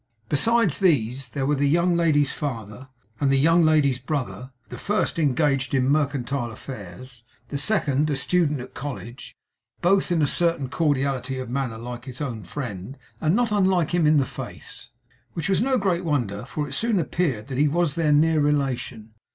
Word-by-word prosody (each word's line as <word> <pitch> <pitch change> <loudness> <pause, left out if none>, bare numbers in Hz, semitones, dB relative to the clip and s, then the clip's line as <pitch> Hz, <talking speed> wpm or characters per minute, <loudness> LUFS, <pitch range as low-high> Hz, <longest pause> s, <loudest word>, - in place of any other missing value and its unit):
Besides 225 +3 +2
these, 135 - +1
there 135 +2 -2
were 145 - +2
the 140 0 +1
young 170 +3 +3
ladies' 150 -4 +2
father, 115 -3 -5 0.3
and 140 - +2
the 135 - +4
young 165 +5 +4
ladies' 150 -5 +3
brother; 130 -1 -4 0.2
the - - -8
first 205 -3 -1
engaged 140 -2 +1
in 130 -1 +2
mercantile 140 -3 0
affairs; 120 +1 -10 0.3
the 140 - -3
second, 150 -5 +1
a 145 - 0
student 150 0 +1
at 125 - -10
college; 125 -3 -7 0.4
both, 190 +1 +2
in 165 -3 +2
a - - +5
certain 165 -4 0
cordiality 135 -4 0
of 130 -2 -5
manner, 125 -4 -2
like 120 +1 -7
his 130 -2 -8
own 120 -9 -4
friend, 120 0 -6 0.2
and 160 +4 +2
not 240 -1 +1
unlike 190 -5 +2
him 175 -3 +2
in 150 -3 +4
face. - - -9 0.4
Which 165 -1 -3
was 195 0 +2
no 260 +1 +2
great 185 -4 0
wonder, 120 - -1
for 145 +3 -4
it 140 - -8
soon 225 +8 0
appeared 150 -9 -1
that 130 0 -3
he 150 - +4
was 165 0 +1
their 160 -2 +1
near 155 +2 +4
relation. 135 -6 -1
145 Hz, 175 wpm, -24 LUFS, 130-165 Hz, 0.4 s, a